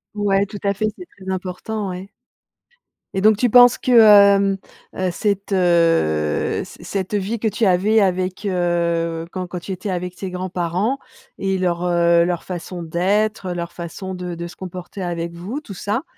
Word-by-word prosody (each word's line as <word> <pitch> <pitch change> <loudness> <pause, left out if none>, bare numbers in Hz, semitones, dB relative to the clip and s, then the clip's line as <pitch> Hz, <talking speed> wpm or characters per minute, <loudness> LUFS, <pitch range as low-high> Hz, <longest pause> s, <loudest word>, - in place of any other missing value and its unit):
Ouais, 200 -1 +2
tout 205 - -8
à 200 0 +2
fait, 215 +2 0
c'est 360 - -9
très 190 -7 -8
important, 190 +3 -4
ouais 185 +2 -7 1.0
et 190 - -1
donc 215 +1 +5
tu 245 +3 +2
penses 245 +1 +7
que, 255 - -1
hem, 200 -3 +7 0.4
heu, 185 0 0
cette, 200 +2 -2
heu, 165 - +2
ce - - -13
cette 195 +1 -3
vie 205 +3 -2
que 220 - 0
tu 215 +2 0
avais 200 +4 +3
avec, 185 +1 -1
heu, 170 -3 0
quand 185 -1 -4
quand 180 0 -5
tu 185 - -8
étais 185 +2 -4
avec 180 -1 -3
tes 190 - -5
grands-parents 180 +6 -2 0.4
et 195 -1 0
leur, 175 -1 -1
heu, 170 -1 +4
leur 175 -1 -2
façon 175 -1 -6
d'être, 190 +4 0
leur 170 -1 -4
façon 180 +2 -6
de 180 -1 -5
de 170 +1 -5
se 175 - -12
comporter 185 +1 -8
avec 170 -1 -3
vous, 190 +11 -5
tout 215 - -9
ça, 205 - -2
185 Hz, 180 wpm, -20 LUFS, 175-205 Hz, 1.0 s, penses